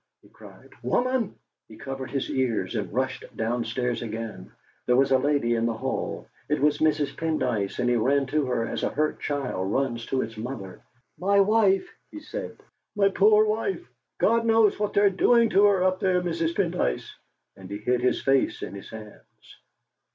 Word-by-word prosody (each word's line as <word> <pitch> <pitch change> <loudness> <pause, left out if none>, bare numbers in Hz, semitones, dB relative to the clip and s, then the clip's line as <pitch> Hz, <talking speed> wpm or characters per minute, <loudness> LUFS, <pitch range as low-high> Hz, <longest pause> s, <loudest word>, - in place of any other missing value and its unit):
he - - -20
cried - - -16
"woman!" 250 -4 0 0.3
He 110 - -14
covered 135 +2 -6
his 135 - -2
ears 115 -8 -1
and 100 -3 -3
rushed 130 0 -2
downstairs 120 +2 -1
again. 115 -1 -6 0.4
There 125 - +4
was 135 +1 +3
a 130 - +5
lady 140 -4 +1
in 115 0 +1
the 115 -1 -2
hall. - - -4 0.2
It 150 - +1
was 145 +1 +2
Mrs. 150 -2 +1
Pendyce, 150 -11 -1
and 125 - 0
he 120 0 +3
ran 135 +5 +2
to 145 +1 0
her, 115 -2 0
as - - -4
a - - 0
hurt 155 +1 -1
child 125 -10 -2
runs 120 -3 -1
to 130 - 0
its 110 -1 -8
mother. 110 -5 -7 0.4
"My 200 +2 +3
wife," 200 -1 +3 0.2
he 310 - -9
said 440 +12 -7 0.4
"my 200 -1 +4
poor 210 +2 +5
wife! 225 - -2 0.3
God 230 0 +3
knows 225 -3 +3
what 210 -1 -1
they're 200 -1 +4
doing 230 +4 +3
to 200 +2 +5
her 195 -3 +3
up 185 0 +1
there, 185 -1 +2
Mrs. 170 -2 -2
Pendyce!" 170 - -1 0.5
and 95 -1 -12
he 100 - -4
hid 125 +4 0
his 125 - +1
face 135 -1 +1
in - - -6
his 100 -1 -9
hands. 110 -2 -13
140 Hz, 180 wpm, -26 LUFS, 115-195 Hz, 0.5 s, a